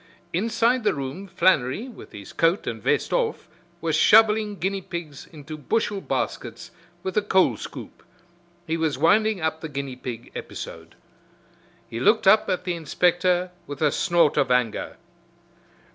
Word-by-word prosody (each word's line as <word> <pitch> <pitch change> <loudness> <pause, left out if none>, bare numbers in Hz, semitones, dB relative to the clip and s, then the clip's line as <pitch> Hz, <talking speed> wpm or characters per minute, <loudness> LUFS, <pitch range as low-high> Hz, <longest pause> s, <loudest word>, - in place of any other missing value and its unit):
Inside 230 +6 +1
the 210 - +2
room 140 +8 -5
Flannery, 185 - +1
with' 245 - -12
his 100 -2 -10
coat 165 +5 +2
and - - -4
vest - - 0
off, 475 -3 -1 0.3
was 160 -1 0
shoveling 215 -1 +5
guinea 195 +1 -2
pigs 165 -6 -7
into 155 -1 -10
bushel 205 - -1
baskets - - -4 0.3
with 190 - -4
a - - +5
coal 190 -2 +3
scoop. - - -9 0.6
He 160 +1 -1
was 160 -4 0
winding 210 +6 +3
up 160 0 -1
the 160 - -5
guinea 140 -2 -5
pig 120 -2 -7
episode. - - -8 0.9
He 115 - -6
looked 215 - +3
up 215 +3 +5
at 185 0 -1
the 180 -1 -2
inspector 180 +2 +1 0.2
with 145 -1 -7
a 150 -2 +3
snort 170 -4 +2
of 135 - +2
anger. 125 -3 0
175 Hz, 150 wpm, -24 LUFS, 145-205 Hz, 0.9 s, shoveling